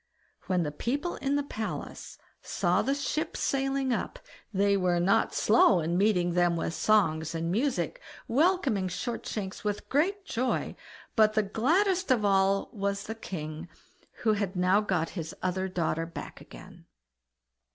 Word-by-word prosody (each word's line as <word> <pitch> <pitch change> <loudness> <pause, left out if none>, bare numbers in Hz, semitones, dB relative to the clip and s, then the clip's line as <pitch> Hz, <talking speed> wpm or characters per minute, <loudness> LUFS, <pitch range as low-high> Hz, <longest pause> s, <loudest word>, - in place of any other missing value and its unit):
When 180 -2 +1
the 150 - -3
people 280 - -2
in 275 +1 -1
the 285 - +1
palace 220 -6 -6 0.2
saw - - +1
the 275 - 0
ship 305 +3 -2
sailing 270 -1 0
up, - - -3 0.3
they 200 0 +2
were 180 -2 +2
not 195 +6 +2
slow 210 -4 +5
in 165 +1 -1
meeting 180 -3 +2
them 175 -1 +3
with 165 0 -2
songs 165 -7 +2
and 165 +1 -2
music, 275 - -1 0.3
welcoming 275 - +2
Shortshanks 200 0 -4
with 210 -1 -3
great 380 +8 +1
joy; 255 - -1 0.4
but 215 -2 +5
the 215 - +2
gladdest 350 - +1
of 235 -5 +3
all 195 0 +2
was 200 -1 -2
the 220 - -5
king, 160 -6 -6 0.5
who 220 -2 +4
had 200 -2 -2
now 185 +3 +3
got 180 -6 0
his 165 -4 -6
other 185 +1 0
daughter 165 -2 -1
back 165 - -8
again. - - -13
200 Hz, 150 wpm, -29 LUFS, 180-260 Hz, 0.5 s, slow